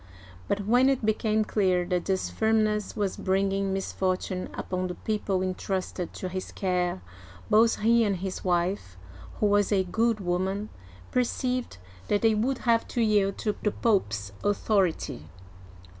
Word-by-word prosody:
But 200 - -1
when 245 +5 +4
it 265 -5 0
became 215 0 +2
clear 185 -5 +1
that 180 -1 -1
this 190 -1 -1
firm 220 0 +2
ness 210 -1 -1
was 200 -3 -1
bringing 195 0 0
misfortune 185 -1 -2
upon 185 0 -3
the 180 - -5
people 200 -3 -1
intrusted 185 -1 -3
to 185 - -5
his 185 +1 -5
care, 180 - -1 0.5
both 225 +1 +4
he 230 +2 +4
and 205 -3 +1
his 185 +1 -5
wife 175 - -1 0.2
— - - -16
who - - +2
was 205 0 +3
a 195 -2 +3
good 225 +4 +1
woman 190 +3 -1 0.2
— 90 0 -20
perceived 250 - -1 0.3
that 205 - +1
they 225 -1 +5
would 240 +5 0
have 230 -1 +3
to 240 - -1
yield 205 -3 +2
to 210 -2 -1
the 210 - +2
Pope*s 105 - 0
authority. 195 - 0
195 Hz, 160 wpm, -27 LUFS, 185-215 Hz, 0.5 s, they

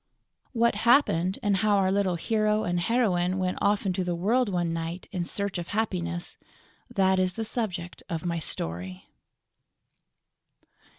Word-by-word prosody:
What 235 -1 +3
happened 200 - +3
and 200 -2 +2
how 205 +1 +3
our 190 -1 +2
little 195 -2 +1
hero 215 +4 +1
and 175 0 0
heroine 185 -4 +1
went 185 -1 -1
off 205 0 +2
into 185 -1 0
the 175 -1 -1
world 220 +7 +2
one 175 -3 0
night 165 +2 -4
in 180 -3 -2
search 200 0 -2
of 170 - -5
happiness: 175 -5 -2 0.5
that 190 -4 +2
is 185 -1 +1
the 225 +3 -3
subject 190 -6 -4
of 165 0 -3
my 170 -1 -1
story. 90 - -4
185 Hz, 145 wpm, -27 LUFS, 175-210 Hz, 0.5 s, What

